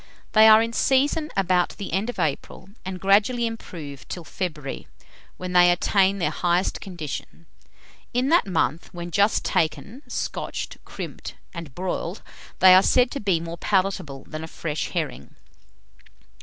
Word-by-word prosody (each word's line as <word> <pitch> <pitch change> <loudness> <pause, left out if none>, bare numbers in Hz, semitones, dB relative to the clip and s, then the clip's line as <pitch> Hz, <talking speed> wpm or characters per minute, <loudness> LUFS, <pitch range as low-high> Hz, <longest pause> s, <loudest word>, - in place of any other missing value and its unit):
They 220 0 +7
are 220 +1 +8
in 230 0 -4
season 285 +5 +2
about 185 -2 +1
the 200 - -6
end 200 +6 0
of 245 - -5
April, 160 +5 -3
and 185 0 -5
gradually 205 +6 +3
improve 165 -11 -7
till 175 - -6
February, 155 -5 -5 0.5
when 180 0 -5
they 175 0 +7
attain 190 +2 +3
their 180 - 0
highest 175 +2 0
condition. 160 -4 -7 0.7
In 250 +3 +1
that 335 -8 +4
month, 165 -3 -1
when 175 0 -6
just 200 +4 +2
taken, 160 - -1
scotched - - -4
(crimped), - - -7 0.2
and 165 -7 -8
broiled, 180 0 -4 0.3
they 185 0 +8
are 185 - +8
said 250 +4 +3
to 280 - -4
be 190 -5 +1
more 170 0 -7
palatable 185 -9 -1
than 155 +1 -6
a - - -6
fresh 155 -2 -4
herring. 70 +3 -4
185 Hz, 150 wpm, -24 LUFS, 165-205 Hz, 0.7 s, are